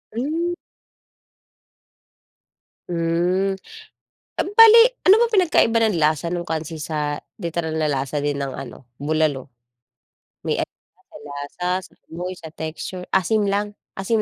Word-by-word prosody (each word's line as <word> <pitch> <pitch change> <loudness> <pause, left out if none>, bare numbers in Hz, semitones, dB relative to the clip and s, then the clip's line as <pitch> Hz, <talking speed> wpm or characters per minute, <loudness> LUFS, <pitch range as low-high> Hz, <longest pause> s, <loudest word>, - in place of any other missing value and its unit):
Hmm. 325 +8 -1 2.4
Hmm, 175 +3 +1 0.8
bale 450 +3 +7 0.2
ano 385 +3 +7
ba 475 - +4
pinagkaiba 300 - +4
ng 215 -6 +2
lasa 155 +1 +1
nung 175 0 -3
kansi 160 -1 -4
sa 150 -1 -2 0.2
literal 165 -1 -2
na 155 -1 0
lasa 140 +1 -1
din 145 -1 -1
ng 140 -1 -3
ano, 135 -1 -9 0.2
bulalo? 150 -3 0 1.0
May - - 0
pinagkaiba - - -10
ba - - -15 0.4
sa 180 +1 0
lasa, - - -14
sa - - -26 0.2
amoy, 180 +2 -4
sa 160 -1 -11
texture? 165 +3 -6
Asim 205 +2 +2
lang, 205 +1 -1 0.2
asim 215 +3 +1
170 Hz, 125 wpm, -22 LUFS, 155-210 Hz, 2.4 s, bale